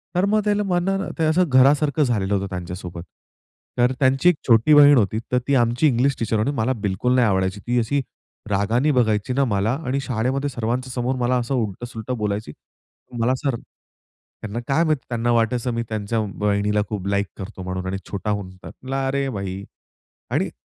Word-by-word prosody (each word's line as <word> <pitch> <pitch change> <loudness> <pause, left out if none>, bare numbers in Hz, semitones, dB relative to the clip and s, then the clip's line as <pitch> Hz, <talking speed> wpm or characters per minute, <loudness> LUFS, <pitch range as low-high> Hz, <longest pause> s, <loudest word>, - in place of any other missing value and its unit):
तर 180 - +3
मग 215 +1 +2
त्याला 210 0 +1
म्हणल 195 +1 0
ते 160 - +2
असं 165 +2 +2
घरासारखं 145 +3 +4
झालेलं 105 -6 0
होतं 100 0 -2
त्यांच्या 90 -1 -5
सोबत. 85 -2 -8 0.7
तर 125 +1 +3
त्यांची 135 +5 +4
एक 180 - +3
छोटी 115 +5 +5
बहीण 145 -1 +8
होती, 110 -1 +1
तर 125 - +3
ती 140 - +3
आमची 120 +4 +3
इंग्लिश 135 +1 +2
टीचर 110 -1 0
होती 110 +7 +1
मला 120 +3 +1
बिलकुल 125 +7 0
नाही 125 -2 +4
आवडायची. 95 0 0
ती 120 0 +2
अशी 140 +5 0 0.5
रागाने 110 +9 +1
बघायची 110 -3 +1
ना 140 +2 +2
मला 105 -1 0
आणि 130 +2 0
शाळेमध्ये 130 +3 -1
सर्वांच्या 125 +1 -3
समोर 125 +1 -1
मला 125 0 +1
असं 120 +3 -2
उलट-सुलटं 115 +2 -4
बोलायची. 105 -4 -3 0.7
मला 120 +3 +2
जर, 135 -3 +1 0.9
त्यांना 115 +2 -4
काय 150 +4 +2
माहिती 155 -5 0
त्यांना 120 0 0
वाटायचं 120 +2 +1
मी 115 0 -1
त्यांच्या 110 +1 -2 0.2
बहिणीला 105 0 +1
खूप 100 -3 -4
लाइक 100 0 0
करतो 95 -1 -8
म्हणून 95 0 -4
आणि 95 - -2
छोटा 100 +1 -3
होऊन 100 -2 -3 0.2
म्हणला, 135 +1 -4
"अरे 140 +1 0
बाई 100 -4 -5 0.7
आणि - - 0
120 Hz, 180 wpm, -22 LUFS, 105-135 Hz, 0.9 s, बहीण